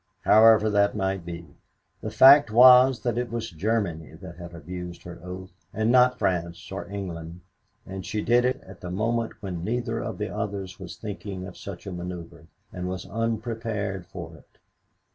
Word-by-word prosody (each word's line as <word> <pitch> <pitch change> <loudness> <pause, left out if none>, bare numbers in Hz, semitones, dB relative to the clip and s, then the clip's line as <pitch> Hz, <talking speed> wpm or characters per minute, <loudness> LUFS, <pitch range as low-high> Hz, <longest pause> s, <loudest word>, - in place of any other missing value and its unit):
However 110 0 +6
that 100 0 +2
might 95 -2 -1
be, 85 0 -6 0.6
the - - -4
fact 140 -1 +7
was 125 +2 +7
that 120 -1 0
it 125 - -3
was 115 -2 -4
Germany 85 -3 -2
that 85 0 -11
had 85 -1 -9
abused 90 +2 -8
her 85 -1 -9
oath 90 +1 -8 0.2
and 110 +2 0
not 125 0 +5
France 85 -4 -2
or 90 -2 -6
England, 90 -4 -6 0.4
and 95 0 -7
she 105 +4 -3
did 120 +1 +3
it 125 +1 -1
at 95 0 -13
the 90 - -6
moment 115 +5 -1
when 90 -4 -5
neither 115 +2 -2
of - - -5
the 105 -1 -4
others 100 -3 -4
was 95 -3 -9
thinking 100 -3 -6
of 90 - -10
such 100 -2 -9
a 100 - -5
maneuver 90 -1 -8 0.3
and 90 0 -4
was 95 0 -5
unprepared 110 -3 -3
for - - -9
it. - - -23
100 Hz, 175 wpm, -26 LUFS, 90-115 Hz, 0.6 s, fact